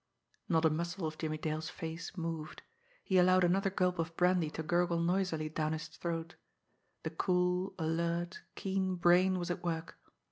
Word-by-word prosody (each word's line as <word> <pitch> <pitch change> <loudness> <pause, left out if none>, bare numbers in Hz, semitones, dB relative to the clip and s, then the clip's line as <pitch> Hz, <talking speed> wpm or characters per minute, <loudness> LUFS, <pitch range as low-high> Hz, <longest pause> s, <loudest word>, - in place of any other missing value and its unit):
_ - - -50 0.5
Not 165 -2 +3
a 160 - +5
muscle 170 +3 -2
of 155 0 -4
Jimmie 155 -1 -2
Dale's 155 +1 -3
face 165 +3 -6
moved. 165 -2 -4 0.4
He 190 -1 +3
allowed 185 +1 +5
another 195 +3 +3
gulp 180 -2 0
of 165 0 -2
brandy 180 -3 +3
to 160 +1 -5
gurgle 175 +1 +2
noisily 170 -2 +1
down 155 0 -1
his 155 0 -5
throat. 165 +1 -4 0.7
The - - -3
cool, 180 0 +1
alert, 170 +1 -1
keen 190 -1 -1
brain 180 +2 +4
was 175 0 -2
at 175 - -4
work. 165 -1 -3
170 Hz, 170 wpm, -33 LUFS, 160-180 Hz, 0.7 s, a